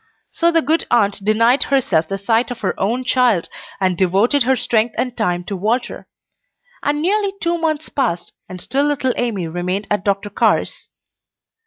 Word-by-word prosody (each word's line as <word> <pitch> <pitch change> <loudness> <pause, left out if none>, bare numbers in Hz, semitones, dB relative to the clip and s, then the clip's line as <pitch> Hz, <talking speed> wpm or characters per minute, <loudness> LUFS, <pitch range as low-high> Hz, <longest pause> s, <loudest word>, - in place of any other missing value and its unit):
So 335 - +2
the 330 -1 +2
good 315 +5 0
aunt 205 -3 +2
denied 230 +5 +3
herself 245 - +1
the 195 - -3
sight 225 +5 +1
of 245 - -7
her - - 0
own 235 +6 0
child, 245 -8 +2 0.3
and 185 -2 +1
devoted 195 - +2
her 260 +2 +3
strength 235 -2 0
and 250 -1 -2
time 180 -6 -1
to 195 +3 -5
Walter; 225 +6 -2 0.7
and 295 +1 -1
nearly 400 +2 +1
two 340 0 -1
months 315 -2 -1
passed, 175 - -2 0.2
and 185 - -8
still 270 +9 0
little 275 -3 0
Amy 210 -8 -2
remained 180 +4 -3
at 205 -2 0
Dr. 200 0 -1
Carr's. - - 0
230 Hz, 170 wpm, -19 LUFS, 195-270 Hz, 0.7 s, denied